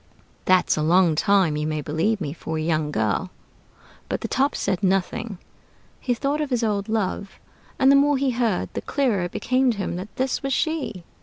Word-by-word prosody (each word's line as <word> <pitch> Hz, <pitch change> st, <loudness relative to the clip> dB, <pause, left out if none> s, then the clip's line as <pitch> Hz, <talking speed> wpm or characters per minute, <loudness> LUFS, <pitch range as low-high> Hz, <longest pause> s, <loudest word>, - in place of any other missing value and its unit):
That's 185 Hz, -1 st, +4 dB
a -, -, 0 dB
long 170 Hz, +2 st, +4 dB
time, 190 Hz, -2 st, +3 dB
you 150 Hz, 0 st, -1 dB
may 155 Hz, -1 st, -2 dB
believe 160 Hz, +9 st, 0 dB
me, 150 Hz, -5 st, -4 dB
for 160 Hz, -1 st, -5 dB
a -, -, -2 dB
young 155 Hz, -1 st, 0 dB
girl." 110 Hz, -, -1 dB, 0.8 s
But -, -, -2 dB
the -, -, -3 dB
Top 275 Hz, +2 st, +1 dB
said 195 Hz, -2 st, -1 dB
nothing. 195 Hz, +3 st, 0 dB, 0.6 s
He 245 Hz, -2 st, -1 dB
thought 285 Hz, +5 st, -1 dB
of 300 Hz, -, -2 dB
his 245 Hz, -3 st, 0 dB
old 205 Hz, -2 st, -1 dB
love; 200 Hz, -2 st, -2 dB, 0.4 s
and 265 Hz, 0 st, +5 dB
the -, -, +6 dB
more 285 Hz, 0 st, +4 dB
he 270 Hz, -1 st, +1 dB
heard, 230 Hz, -6 st, 0 dB
the -, -, -3 dB
clearer 240 Hz, -10 st, 0 dB
it 175 Hz, -, -6 dB
became 255 Hz, +1 st, +1 dB
to 230 Hz, -, -1 dB
him 185 Hz, -3 st, -3 dB
that 195 Hz, +3 st, -8 dB
this 260 Hz, 0 st, -1 dB
was 275 Hz, -1 st, -1 dB
she. 295 Hz, -, -2 dB
200 Hz, 205 wpm, -23 LUFS, 170-255 Hz, 0.8 s, the